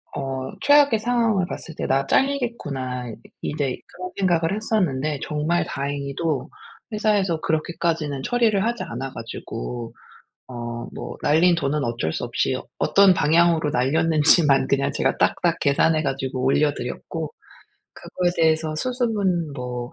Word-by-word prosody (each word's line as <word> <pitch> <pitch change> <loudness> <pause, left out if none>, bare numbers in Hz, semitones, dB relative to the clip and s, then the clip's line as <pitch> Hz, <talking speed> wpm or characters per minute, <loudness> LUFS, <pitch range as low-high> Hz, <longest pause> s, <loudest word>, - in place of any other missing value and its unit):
어 135 -1 -4
최악의 285 -5 +5
상황을 230 -4 +1
봤을 165 - -7
때 - - -3
'나 135 +1 +2
잘리겠구나.' 145 - -1
이 110 - -7 0.3
이제 145 -4 -2 0.2
그런 185 0 -7
생각을 175 -2 +1
했었는데 155 -10 0
정말 155 +3 0
다행히도 140 +1 -3 0.4
회사에서 205 -6 +1
그렇게까지는 160 -3 -1
처리를 225 - +2
하지 235 0 -1
않아 130 +3 -5
가지고 115 - -6 0.6
어 120 -1 -5 0.2
뭐 - - -7
날린 170 +4 +4
돈은 145 -2 -1
어쩔 115 -10 -2
수 - - -3
없이 - - 0
어 - - -5
어떤 195 -1 +5
방향으로 165 -1 +3
날렸는지만 150 +1 +3
그냥 140 0 +1
제가 - - 0
딱딱 - - +1
계산해 155 +3 +3
가지고 135 -2 -2
올려 145 +2 +3
드렸고 445 - -6 0.6
그거에 180 -1 -2
대해서 160 -1 +2
수습은 200 - -1
뭐 125 -2 -5
155 Hz, 315 characters per minute, -23 LUFS, 135-185 Hz, 0.6 s, 최악의